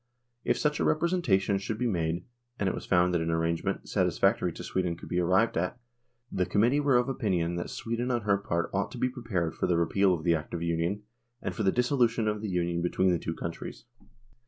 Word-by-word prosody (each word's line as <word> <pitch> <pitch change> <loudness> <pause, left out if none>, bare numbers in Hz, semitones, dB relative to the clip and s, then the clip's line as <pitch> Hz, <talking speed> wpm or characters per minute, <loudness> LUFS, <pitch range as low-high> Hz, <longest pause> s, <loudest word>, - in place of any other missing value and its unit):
If - - +1
such 150 -1 0
a - - +1
representation 130 - +2
should 105 +2 -4
be 125 - -1
made 85 -5 -1 0.3
and 100 - 0
it 95 - +1
was - - -6
found 90 -1 +3
that 85 - +1
an 80 - -1
arrangement, 80 0 -1
satisfactory - - +2
to - - -8
Sweden, 90 -3 -1
could - - -11
be 90 - 0
arrived 95 +5 +2
at, 90 +7 -1 0.5
the 90 - 0
Committee 120 +7 +3
were 140 -3 +4
of 125 - +1
opinion 95 -10 0
that 85 - -4
Sweden 115 +2 -3
on 120 -2 +1
her 100 -2 +2
part 85 -4 -2
ought - - 0
to - - -7
be 130 - +1
pre 125 0 -9
pared 90 -8 -1
for - - -1
the 85 - +2
repeal 95 +3 +3
of 80 - -7
the 85 - +3
Act 80 0 -3
of 85 - -3
Union 85 +5 -1 0.4
and - - -4
for - - -4
the 95 -2 +3
dissolution 120 -2 +2
of 105 -1 -1
the 110 - -3
Union 85 -1 0
between 90 +2 +2
the 85 - +1
two 80 - -4
countries. 85 +6 -6
95 Hz, 230 wpm, -29 LUFS, 85-115 Hz, 0.5 s, were